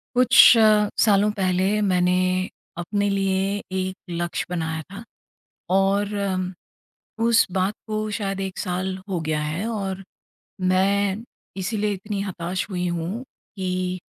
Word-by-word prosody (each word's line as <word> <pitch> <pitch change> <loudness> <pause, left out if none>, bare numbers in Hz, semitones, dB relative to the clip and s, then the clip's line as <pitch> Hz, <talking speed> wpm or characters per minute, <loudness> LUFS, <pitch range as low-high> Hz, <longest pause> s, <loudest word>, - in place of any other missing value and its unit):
कुछ 250 0 +3 0.2
स 215 -2 +5
सालों 210 -1 +4
पहले 185 -1 +1 0.2
मैंने 180 -1 +2 0.6
अपने 200 +4 -1
लिए 195 -1 +1 0.4
एक 185 0 -2
लक्ष्य 175 0 -2
बनाया 160 -2 -2
था 200 +3 -8 0.7
और 200 +2 +2
अम, 185 -2 -2 0.7
उस 230 -1 +5
बात 190 +2 0
को 215 0 -2 0.2
शायद 195 -2 -3
1 190 -1 -5
साल 185 0 -2
हो 180 -3 -1
गया 155 -1 -1
है 155 +7 -3
और 195 -3 -3 0.7
मैं 200 +2 +1 0.3
इसीलिए 205 +2 -1
इतनी 200 +1 -4
हताश 185 -1 -3
हुई 180 -1 -2
हूँ 185 +9 -4 0.3
कि 185 -1 -2
190 Hz, 125 wpm, -23 LUFS, 180-205 Hz, 0.7 s, स